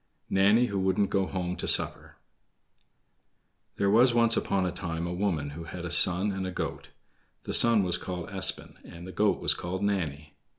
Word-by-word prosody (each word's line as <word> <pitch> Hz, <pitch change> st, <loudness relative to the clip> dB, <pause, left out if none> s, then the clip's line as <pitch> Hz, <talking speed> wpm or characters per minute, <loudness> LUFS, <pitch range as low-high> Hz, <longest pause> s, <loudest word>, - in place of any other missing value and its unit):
Nanny 100 Hz, +5 st, +3 dB
Who 100 Hz, -4 st, -3 dB
Wouldn't 95 Hz, +1 st, 0 dB
Go 95 Hz, -1 st, 0 dB
Home 90 Hz, -1 st, -4 dB
to -, -, -5 dB
Supper -, -, -2 dB, 1.6 s
There 100 Hz, 0 st, 0 dB
was 120 Hz, +3 st, +4 dB
once 115 Hz, -1 st, +3 dB
upon 95 Hz, -4 st, -1 dB
a 90 Hz, -, -2 dB
time 85 Hz, 0 st, -5 dB
a 85 Hz, -, -4 dB
woman 85 Hz, -7 st, -2 dB
who 80 Hz, +3 st, -9 dB
had 90 Hz, +1 st, -8 dB
a 85 Hz, -, -6 dB
son 90 Hz, +3 st, +3 dB
and 95 Hz, -1 st, -4 dB
a -, -, -5 dB
goat. 70 Hz, -5 st, -6 dB, 0.5 s
The -, -, -6 dB
son 115 Hz, -3 st, +7 dB
was 90 Hz, -1 st, -2 dB
called 90 Hz, -2 st, -6 dB
Espen 95 Hz, -1 st, 0 dB
and 85 Hz, +1 st, -12 dB
the 95 Hz, -, -9 dB
goat 105 Hz, +2 st, 0 dB
was -, -, +2 dB
called 95 Hz, +3 st, -6 dB
Nanny. 75 Hz, -7 st, -3 dB
95 Hz, 185 wpm, -27 LUFS, 85-100 Hz, 1.6 s, son